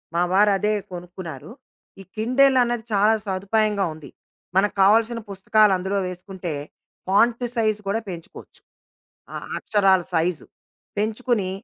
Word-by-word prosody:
మా 175 - +2
వారదే 205 +1 +3 0.2
కొనుక్కున్నారు. 175 - -8 0.5
ఈ - - -10
కిండెల్ 260 +4 +3
అనేది 240 -2 -2
చాలా 210 +2 +4
సదుపాయంగా 200 +1 0
ఉంది. 150 -3 -12 0.5
మనకు 200 +2 +2
కావాల్సిన 225 +3 +3
పుస్తకాలు 205 +1 +3
అందులో 190 +2 -2
వేసుకుంటే, 180 -2 -6 0.5
ఫాంట్ 230 +5 +3
సైజ్ 215 -2 +1
కూడా 215 +3 0
పెంచుకోవచ్చు. 170 -2 -10 0.7
ఆ - - -4 0.2
అక్షరాల 195 -4 +3
సైజు 165 0 0 0.5
పెంచుకుని 220 -2 -1
200 Hz, 115 wpm, -23 LUFS, 185-220 Hz, 0.7 s, చాలా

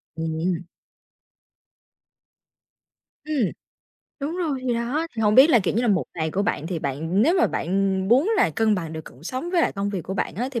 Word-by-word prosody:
Ừm, 160 -1 -3
ừm. 175 0 -2 2.6
Ừm, 310 0 -3 0.9
đúng 300 +5 -3
rồi, 315 -7 -1
thì 245 - +1
đó, 255 +8 -1
thì 225 - -1
hổng 210 0 +3
biết 270 +7 +8
là, 240 - +6
kiểu 190 0 -1
như 235 - +1
là, 240 - +1
1 195 -3 +2
ngày 160 -2 -2
của 200 +4 0
bạn, 200 -7 -1
thì 170 -1 -3
bạn 160 +9 -1
nếu 330 +7 +4
mà - - +4
bạn 190 +2 0
muốn 275 - +4
là 280 - +3
cân 215 +6 +2
bằng 165 -4 -4
được 160 -1 -6
cuộc 130 - -14
sống 260 +7 -4
với 355 -2 +2
lại - - +1
công 200 0 -2
việc 190 -4 -3
của 190 - -5
bạn 195 - -2
á, 245 +6 -2
thì 235 -4 -3
205 Hz, 215 wpm, -24 LUFS, 170-260 Hz, 2.6 s, biết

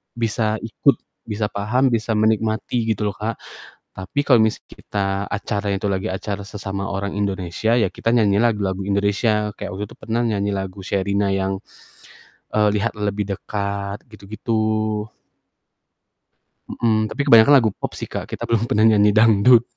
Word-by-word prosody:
bisa 110 -1 0
ikut, 115 - +2 0.3
bisa 105 -1 -2
paham, 125 +6 +1
bisa 110 -1 0
menikmati, 110 +2 0
gitu 105 0 -1
loh, - - -15
Kak. 110 +1 -3 0.6
Tapi 95 +10 -2
kalau 125 -5 +5
misalnya 110 0 0
kita 100 -1 -2 0.2
acara 100 0 -3
itu 100 +2 -2
lagi 95 0 -2
acara 100 +2 -4
sesama 100 -1 -5
orang 100 0 -3
Indonesia, 100 +3 0
ya 115 - +2
kita 115 +1 0
nyanyi 105 -3 +3
lagu-lagu 105 -5 +1
Indonesia, 105 +1 +1
kayak - - -6
waktu 105 +2 -4
itu - - -12
pernah 115 +1 -1
nyanyi 100 -3 0
lagu 95 0 -5
Sherina 100 +1 0
yang, 95 0 -1 0.9
eee, 105 -1 +3
"Lihat 115 +3 0
lebih 105 0 -1
dekat," 100 +1 -4
gitu-gitu. 110 +3 -6 2.2
Mhm, 110 -2 0
tapi 145 - -2
kebanyakan 115 +3 +7
lagu 110 -2 +2
pop - - -4
sih, - - -7
Kak, - - -5
kita - - -5
belum 115 -1 +1
pernah 110 +1 +4
nyanyi 105 -1 +5
dangdut. 115 +2 +5
105 Hz, 150 wpm, -21 LUFS, 100-110 Hz, 2.2 s, kebanyakan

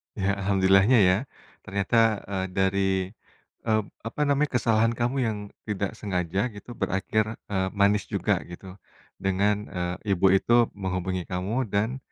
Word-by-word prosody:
Ya, 100 +1 0
alhamdulillah-nya 95 +4 +4
ya. 95 - +4 0.5
Ternyata, 100 +4 -1 0.3
eee, 95 -1 -1
dari, 95 0 +2 0.8
eee, 110 -1 +2 0.3
apa 135 - -9
namanya, 145 +1 +2
kesalahan 115 0 +2
kamu 120 +3 -1
yang 110 -2 -2 0.3
tidak 100 -2 -2
sengaja 95 -2 -2
gitu 100 +4 -11
berakhir, 100 +3 +1 0.3
eee, 95 -1 0
manis 100 0 +3
juga - - +1
gitu. 95 +2 -10 0.4
Dengan, 100 +2 +1 0.2
eee, 90 +3 -1
ibu 95 +1 +2
itu 115 +5 +4
menghubungi 90 -1 -2
kamu 100 +8 -1
dan 110 +6 0
100 Hz, 135 wpm, -26 LUFS, 95-110 Hz, 0.8 s, alhamdulillah-nya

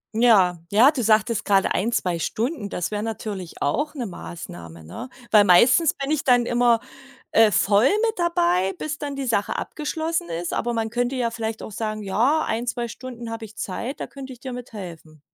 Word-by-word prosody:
Ja, 210 -7 +5
ja, 230 +8 +6
du 265 -6 -2
sagtest 220 +1 +2
grade 195 -1 +3
1, 225 +6 0
2 175 -6 0
Stunden, 225 - -2
das 180 +1 -3
wär 210 -1 -2
natürlich 210 -5 -6
auch 290 - 0
'ne 255 -4 -3
Maßnahme, 85 - -9
ne? 85 - -8 0.2
Weil 210 -2 +7
meistens 250 - +5
bin 275 +1 -4
ich 310 -2 0
dann 245 -2 +4
immer, 240 -1 +3 0.5
äh, 225 -1 +6
voll 200 +5 +3 0.2
mit 445 -4 -2
dabei, 190 - +2
bis 305 0 -4
dann 285 -2 -5
die 275 -1 -3
Sache 210 -5 0
abgeschlossen 315 - -3
ist. 170 0 -4
Aber 240 +1 -1
man 225 -1 -1
könnte 245 +3 -1
ja 240 -2 0
vielleicht 225 -1 -4
auch - - -8
sagen: 215 0 -4
„Ja, 245 +11 +2
1, 235 +2 -2
2 240 -1 -2
Stunden 240 -2 -8
habe 225 0 -5
ich 215 0 -15
Zeit, 245 +9 -5
da - - -4
könnte 270 -1 -9
ich 245 - -17
dir 260 - -6
mit 245 -1 -8
helfen.“ 165 -6 -9
225 Hz, 200 wpm, -23 LUFS, 195-255 Hz, 0.5 s, Weil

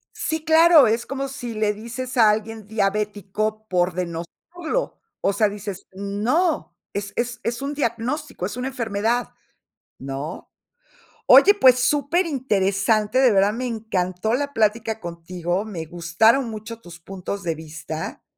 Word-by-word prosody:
Sí, 315 0 -3
claro, 320 -3 +7
es 230 +2 0
como 275 0 -3
si 245 -3 -6
le 215 -1 +1
dices 235 +4 -6
a 225 -2 +7
alguien 220 0 -3
diabético 210 0 -2
por 180 -1 +1
denostarlo, 185 - -4 0.2
o 200 - +2
sea, 210 +1 +2
dices, 200 -1 -7
no, 205 - -1 0.2
es 200 0 -5
es 245 0 -2
es 235 +3 -3
un 280 - -2
diagnóstico, 255 - -3
es 205 +6 -4
una 250 +1 -2
enfermedad, 230 -1 -1 0.7
¿no? 135 +3 -6 0.8
Oye, 405 - +8
pues, 260 -11 +5
superinteresante, 250 - +1
de 260 -2 +5
verdad 200 +1 +3
me 250 +3 -3
encantó 220 -3 -2
la 285 +3 -1
plática 220 -1 0
contigo, 175 +2 -3
me 180 -7 -6
gustaron 180 - +2
mucho 220 +1 -8
tus 175 -3 -12
puntos 195 +2 -6
de 170 -2 0
vista, 160 0 -7
215 Hz, 135 wpm, -23 LUFS, 195-250 Hz, 0.8 s, Oye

